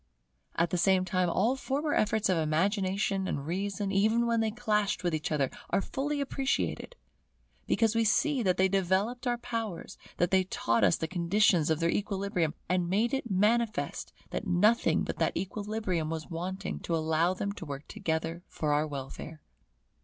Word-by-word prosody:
At 170 Hz, 0 st, +1 dB
the 180 Hz, -, 0 dB
same 185 Hz, 0 st, +3 dB
time 185 Hz, -2 st, +1 dB
all 230 Hz, +9 st, +2 dB
former 285 Hz, +3 st, -1 dB
efforts 215 Hz, 0 st, +2 dB
of 185 Hz, -, +2 dB
Imagination 190 Hz, +4 st, 0 dB
and 140 Hz, -5 st, -3 dB
Reason, 195 Hz, +4 st, -2 dB
even 220 Hz, +4 st, +3 dB
when 230 Hz, -1 st, +1 dB
they 220 Hz, -1 st, +1 dB
clashed 210 Hz, -4 st, 0 dB
with 175 Hz, -2 st, 0 dB
each 155 Hz, 0 st, -2 dB
other, 140 Hz, -3 st, +1 dB, 0.2 s
are -, -, +2 dB
fully 285 Hz, +8 st, -2 dB
appreciated; 275 Hz, -, -2 dB, 0.7 s
because 225 Hz, -1 st, +2 dB
we 230 Hz, 0 st, +2 dB
see 245 Hz, +5 st, +2 dB
that 185 Hz, -4 st, +1 dB
they 190 Hz, -, +4 dB
developed 195 Hz, +7 st, 0 dB
our 240 Hz, 0 st, +1 dB
powers, 225 Hz, -6 st, -5 dB, 0.2 s
that 175 Hz, -, +1 dB
they 190 Hz, -1 st, +4 dB
taught 115 Hz, -, 0 dB
us 90 Hz, -4 st, +5 dB
the 160 Hz, -, -3 dB
conditions 175 Hz, -1 st, +2 dB
of 160 Hz, -1 st, +1 dB
their 170 Hz, 0 st, +2 dB
equilibrium, 195 Hz, -5 st, -1 dB
and 180 Hz, -1 st, 0 dB
made 220 Hz, +7 st, +1 dB
it 265 Hz, -3 st, -2 dB
manifest 215 Hz, +3 st, 0 dB, 0.2 s
that 215 Hz, -, -3 dB
nothing 210 Hz, +6 st, +3 dB
but -, -, -4 dB
that -, -, +1 dB
equilibrium 200 Hz, -4 st, -2 dB
was 160 Hz, +1 st, -5 dB
wanting 185 Hz, +3 st, -4 dB
to 170 Hz, -, -2 dB
allow 160 Hz, +3 st, +1 dB
them 200 Hz, +2 st, -2 dB
to 200 Hz, -, -8 dB
work 145 Hz, -1 st, -7 dB
together 160 Hz, +1 st, -3 dB
for 150 Hz, -2 st, -1 dB
our 150 Hz, +1 st, +1 dB
welfare. 145 Hz, +2 st, -7 dB
190 Hz, 175 wpm, -30 LUFS, 165-220 Hz, 0.7 s, us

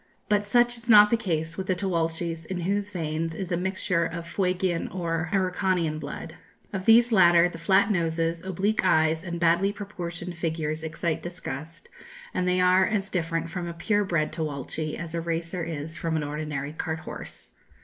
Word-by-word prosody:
But 205 Hz, -1 st, +2 dB
such 240 Hz, +2 st, +3 dB
is 235 Hz, +1 st, -12 dB
not 210 Hz, -1 st, +8 dB
the -, -, +5 dB
case 165 Hz, -7 st, -2 dB
with 190 Hz, -, -4 dB
the 185 Hz, -, +2 dB
Tchuelches 165 Hz, -3 st, -2 dB
in 185 Hz, -2 st, -3 dB
whose 200 Hz, +3 st, -1 dB
veins 165 Hz, -3 st, -3 dB
is 185 Hz, 0 st, -5 dB
a -, -, +2 dB
mixture 185 Hz, -1 st, 0 dB
of 170 Hz, 0 st, -4 dB
Fuegian 180 Hz, 0 st, 0 dB
or 165 Hz, -2 st, -2 dB
Araucanian 185 Hz, -4 st, +1 dB
blood. -, -, -7 dB, 0.4 s
Of 190 Hz, -1 st, -3 dB
these 235 Hz, +2 st, +6 dB
latter 175 Hz, -4 st, +6 dB
the 165 Hz, -2 st, -8 dB
flat 195 Hz, +4 st, +3 dB
noses, 165 Hz, -2 st, 0 dB
oblique 190 Hz, +3 st, 0 dB
eyes, 160 Hz, -2 st, +3 dB
and 170 Hz, -2 st, -4 dB
badly 170 Hz, +4 st, +3 dB
proportioned 180 Hz, -4 st, -6 dB
figures 160 Hz, -2 st, -2 dB
excite 160 Hz, 0 st, -2 dB
disgust, 165 Hz, -2 st, -7 dB, 0.5 s
and 180 Hz, 0 st, 0 dB
they 180 Hz, 0 st, +2 dB
are 180 Hz, +1 st, +5 dB
as 200 Hz, -2 st, -1 dB
different 165 Hz, -2 st, -1 dB
from 175 Hz, 0 st, -4 dB
a 170 Hz, -, -6 dB
pure 205 Hz, +5 st, +1 dB
bred 165 Hz, -5 st, 0 dB
Tchuelche 155 Hz, 0 st, -3 dB
as 170 Hz, -1 st, -6 dB
a 170 Hz, -, -1 dB
racer 170 Hz, +1 st, -2 dB
is 160 Hz, -1 st, -5 dB
from 165 Hz, 0 st, -1 dB
an 155 Hz, -, 0 dB
ordinary 150 Hz, -1 st, -4 dB
cart 160 Hz, 0 st, -3 dB
horse. -, -, -9 dB
170 Hz, 180 wpm, -26 LUFS, 160-190 Hz, 0.5 s, not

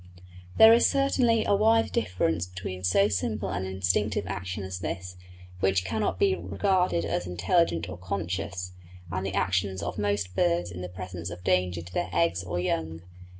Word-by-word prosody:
There 220 Hz, 0 st, +9 dB
is 235 Hz, -, +5 dB
certainly 255 Hz, -5 st, +2 dB
a -, -, +2 dB
wide 225 Hz, +3 st, +3 dB
difference 85 Hz, -2 st, 0 dB
between 90 Hz, 0 st, -7 dB
so 95 Hz, +2 st, +4 dB
simple 100 Hz, 0 st, -2 dB
an 95 Hz, -1 st, -2 dB
instinctive 95 Hz, +2 st, 0 dB
action 95 Hz, +1 st, -4 dB
as 95 Hz, -1 st, -5 dB
this, 90 Hz, 0 st, -5 dB, 0.4 s
which 95 Hz, 0 st, +1 dB
cannot 105 Hz, -2 st, -1 dB
be 95 Hz, +1 st, +3 dB
regarded 100 Hz, -, 0 dB
as 90 Hz, +1 st, -2 dB
intelligent 90 Hz, -, +1 dB
or 90 Hz, 0 st, -8 dB
conscious, 90 Hz, 0 st, -4 dB, 0.4 s
and 95 Hz, +2 st, -2 dB
the 95 Hz, 0 st, -3 dB
actions 95 Hz, 0 st, 0 dB
of -, -, -4 dB
most 100 Hz, -3 st, -1 dB
birds 85 Hz, 0 st, +1 dB
in 90 Hz, +1 st, -7 dB
the 90 Hz, -, -5 dB
presence 90 Hz, -1 st, -6 dB
of 90 Hz, 0 st, -9 dB
danger 90 Hz, -2 st, +1 dB
to 90 Hz, +1 st, -13 dB
their -, -, -1 dB
eggs 85 Hz, +2 st, +1 dB
or 90 Hz, -1 st, -3 dB
young. 80 Hz, -2 st, -2 dB
90 Hz, 170 wpm, -27 LUFS, 90-100 Hz, 0.4 s, There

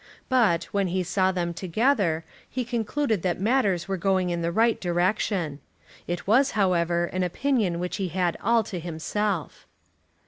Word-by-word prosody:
But, 215 Hz, -10 st, +3 dB
when 200 Hz, -2 st, +1 dB
he 185 Hz, +1 st, -1 dB
saw 185 Hz, +2 st, +1 dB
them 175 Hz, -2 st, -2 dB
together, 185 Hz, -, +1 dB, 0.2 s
he 255 Hz, -1 st, -3 dB
concluded 235 Hz, -, -1 dB
that 180 Hz, -1 st, -1 dB
matters 200 Hz, -5 st, +1 dB
were 195 Hz, -1 st, -1 dB
going 185 Hz, -1 st, +1 dB
in 170 Hz, 0 st, -2 dB
the 170 Hz, 0 st, -1 dB
right 225 Hz, +5 st, +2 dB
direction. 175 Hz, -3 st, 0 dB, 0.5 s
It 175 Hz, 0 st, -3 dB
was, 260 Hz, +7 st, +4 dB
however, 175 Hz, -3 st, +2 dB
an 185 Hz, +2 st, -3 dB
opinion 195 Hz, 0 st, 0 dB
which 180 Hz, +3 st, -3 dB
he 195 Hz, -2 st, -1 dB
had 180 Hz, 0 st, 0 dB
all 230 Hz, -1 st, +3 dB
to 185 Hz, -3 st, -5 dB
himself. 175 Hz, +2 st, -3 dB
185 Hz, 160 wpm, -26 LUFS, 175-215 Hz, 0.5 s, was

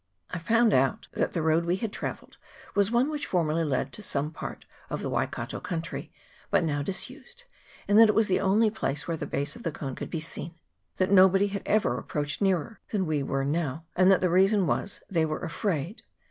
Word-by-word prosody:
I 180 Hz, -, -3 dB
found 225 Hz, +6 st, +3 dB
out 130 Hz, +1 st, +2 dB
that -, -, -1 dB
the 165 Hz, -, -1 dB
road 160 Hz, +1 st, +2 dB
we 175 Hz, +1 st, +1 dB
had 210 Hz, +2 st, -4 dB
travelled -, -, -6 dB, 0.4 s
was 200 Hz, -1 st, +3 dB
one 240 Hz, +5 st, +2 dB
which 295 Hz, -1 st, -3 dB
for 180 Hz, -2 st, +1 dB
merly 155 Hz, +2 st, 0 dB
led 130 Hz, -3 st, -1 dB
to -, -, -7 dB
some 150 Hz, -6 st, -1 dB
part -, -, -7 dB, 0.2 s
of -, -, -4 dB
the -, -, -2 dB
Waikato -, -, -2 dB
country, 170 Hz, 0 st, -5 dB, 0.4 s
but -, -, +3 dB
now 145 Hz, -3 st, 0 dB
disused, 255 Hz, -, -5 dB, 0.4 s
and 205 Hz, +2 st, +5 dB
that 225 Hz, -1 st, +8 dB
it 210 Hz, -, +2 dB
was 220 Hz, -1 st, +4 dB
the 185 Hz, -, +2 dB
only 210 Hz, +3 st, +3 dB
place 150 Hz, -9 st, -2 dB
where 165 Hz, -, -1 dB
the 150 Hz, -2 st, -5 dB
base 145 Hz, +1 st, -1 dB
of -, -, -10 dB
the 165 Hz, -, -2 dB
cone 135 Hz, -3 st, -5 dB
could -, -, -6 dB
be 165 Hz, -, -3 dB
seen; 165 Hz, +1 st, -4 dB, 0.4 s
that 185 Hz, +1 st, +1 dB
nobody 195 Hz, +1 st, +6 dB
had 200 Hz, 0 st, -4 dB
ever 215 Hz, 0 st, +2 dB
approached 150 Hz, 0 st, -3 dB
nearer 195 Hz, +1 st, 0 dB
than 200 Hz, -4 st, 0 dB
we 155 Hz, -3 st, 0 dB
now 135 Hz, -, -4 dB
were; 145 Hz, +2 st, -1 dB
and 185 Hz, +1 st, +5 dB
that 190 Hz, -, +5 dB
the 180 Hz, -, +2 dB
reason 195 Hz, +2 st, +4 dB
was, 195 Hz, -, -2 dB
they 170 Hz, -4 st, +1 dB
were 155 Hz, -1 st, -2 dB
afraid. 180 Hz, +1 st, -2 dB
180 Hz, 215 wpm, -27 LUFS, 155-205 Hz, 0.4 s, that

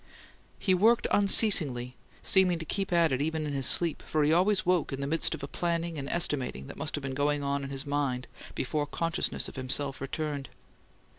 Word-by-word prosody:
He 190 Hz, -, +1 dB
worked 225 Hz, +6 st, +4 dB
unceasingly, 155 Hz, -, +3 dB, 0.3 s
seeming 185 Hz, -2 st, +4 dB
to 165 Hz, -, -6 dB
keep 195 Hz, +4 st, -2 dB
at 170 Hz, -3 st, +3 dB
it 130 Hz, +1 st, 0 dB
even 160 Hz, +1 st, -1 dB
in 145 Hz, -, -3 dB
his 135 Hz, -2 st, +1 dB
sleep, 170 Hz, -3 st, +2 dB
for 155 Hz, -1 st, 0 dB
he 150 Hz, +2 st, +3 dB
always 185 Hz, +4 st, +3 dB
woke 180 Hz, -3 st, +1 dB
in 135 Hz, -, -4 dB
the 140 Hz, -, -2 dB
midst 160 Hz, +2 st, 0 dB
of 145 Hz, -, -10 dB
a -, -, -3 dB
planning 170 Hz, +1 st, -2 dB
and 140 Hz, 0 st, -5 dB
estimating 135 Hz, -, -1 dB
that -, -, -9 dB
must -, -, -2 dB
have 145 Hz, -, -5 dB
been 135 Hz, -1 st, -3 dB
going 145 Hz, +1 st, 0 dB
on 140 Hz, 0 st, -1 dB
in 135 Hz, -, -5 dB
his 135 Hz, +1 st, -3 dB
mind 140 Hz, -3 st, -1 dB, 0.3 s
before 145 Hz, +3 st, -2 dB
consciousness 165 Hz, +5 st, -1 dB
of -, -, -11 dB
himself 135 Hz, +1 st, -1 dB
returned. 145 Hz, -1 st, -4 dB
150 Hz, 205 wpm, -29 LUFS, 140-170 Hz, 0.3 s, worked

